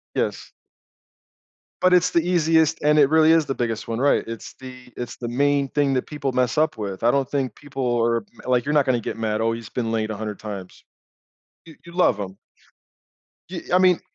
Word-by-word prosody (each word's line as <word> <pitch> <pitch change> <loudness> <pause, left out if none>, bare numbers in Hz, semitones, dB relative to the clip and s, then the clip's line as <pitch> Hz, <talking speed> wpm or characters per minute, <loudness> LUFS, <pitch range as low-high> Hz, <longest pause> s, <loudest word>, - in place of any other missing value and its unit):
Yes. - - -2 1.3
But 185 0 +4
it's 180 0 +4
the 170 - +3
easiest 165 -2 +2
and 150 +1 +4
it 140 -2 +5
really 160 0 +5
is 165 -1 +4
the 135 - -3
biggest 115 -2 -3
one 115 0 -3
right, 140 +2 +3
it's 115 -1 -7
the 125 -1 -11
it's 120 - -6
the 120 - -5
main 140 +3 +1
thing 145 -1 +1
that 130 - -1
people 145 -3 -3
mess 125 +2 0
up 155 +1 +2
with. 100 -2 -5
I 120 - +5
don't 135 -1 0
think 135 -6 -2
people 135 -4 -2
are, 115 -2 +1 0.2
like, 125 -1 +1
"You're 150 - -1
not 145 -2 +4
going 130 -3 +1
get - - -5
mad." 110 -1 -1
"Oh, 115 0 +1
he's 115 -2 -6
been 115 -3 -3
late 110 -1 -1
100 105 -1 -5
times." 100 -4 -8 0.8
You 160 - -13
you 170 - -12
love 175 - +2
him. 95 -1 -6 1.1
Y 175 -2 -5
I - - +7
mean, 185 -2 +4
130 Hz, 205 wpm, -23 LUFS, 115-150 Hz, 1.3 s, I